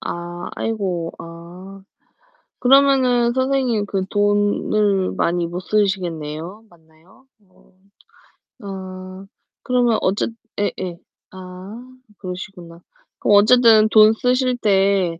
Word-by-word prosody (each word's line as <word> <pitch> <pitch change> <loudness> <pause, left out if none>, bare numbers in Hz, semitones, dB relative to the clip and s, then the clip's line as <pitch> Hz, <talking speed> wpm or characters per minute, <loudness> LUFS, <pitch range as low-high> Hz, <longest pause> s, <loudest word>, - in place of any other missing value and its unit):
아 175 0 -6
아이고. 185 -7 -3
아. 175 +4 -12 0.8
그러면은 255 -2 +4
선생님 260 -5 0
그 195 -2 -2
돈을 205 -1 +1
많이 170 0 -1
못 175 +2 -6
쓰시겠네요. 185 -2 -3
맞나요? 165 +8 -24 0.2
어. 185 - -27 0.9
아. 190 -1 -9 0.4
그러면 245 -3 +1
어쨌 200 +4 -1 0.3
예예. 185 -4 -3 0.3
아. 190 +6 -11 0.3
그러시구나. 180 -2 -9 0.4
그럼 205 - +4
어쨌든 220 0 +5
돈 215 0 +6
쓰실 250 +1 0
때 195 -5 +1
195 Hz, 195 characters per minute, -20 LUFS, 180-225 Hz, 0.9 s, 돈